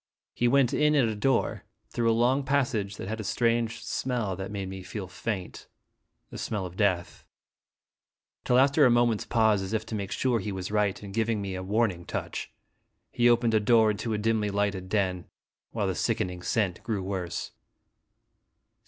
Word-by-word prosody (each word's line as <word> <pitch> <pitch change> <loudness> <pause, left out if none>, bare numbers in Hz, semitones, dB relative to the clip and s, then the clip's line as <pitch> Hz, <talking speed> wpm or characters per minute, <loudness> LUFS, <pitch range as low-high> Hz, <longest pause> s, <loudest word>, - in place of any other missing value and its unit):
He 120 - +1
went 130 0 +3
in 150 0 +3
at 135 -5 +4
a 110 - -2
door 130 +4 0 0.3
through 115 -1 +1
a - - +5
long 125 +5 +2
passage 130 -8 0
that - - -6
had 110 +2 -4
a - - -3
strange 115 +2 0
smell 120 -7 -2
that 95 +1 -5
made 100 -2 -4
me 95 0 -7
feel 95 +1 -6
faint, 95 -1 -5 0.6
a - - -7
smell 105 -4 -2
of 90 -1 -8
death 95 -4 0 1.2
till, 125 - +3
after 140 +3 +5
a 130 - +7
moment's 120 -2 +2
pause, 110 -3 +3
as 95 +2 -5
if 110 0 -1
to 115 - -8
make 100 -2 -3
sure 125 -3 +1
he 105 +1 -4
was 95 0 -5
right, 105 -1 0
and 100 -1 -8
giving 115 0 0
me 100 -1 -4
a 95 - -4
warning 100 -2 0
touch, - - -5 0.6
he 120 0 +3
opened 120 -1 +3
a 110 - +5
door 110 0 +4
into 110 +2 -4
a 110 - 0
dimly 110 -1 +1
lighted 100 -2 -1
den, 95 -4 0 0.4
while 110 -3 -2
the 95 - 0
sickening 90 -4 -1
scent 95 -1 0
grew 105 -3 -2
worse. 95 -3 -4
110 Hz, 185 wpm, -28 LUFS, 95-120 Hz, 1.2 s, a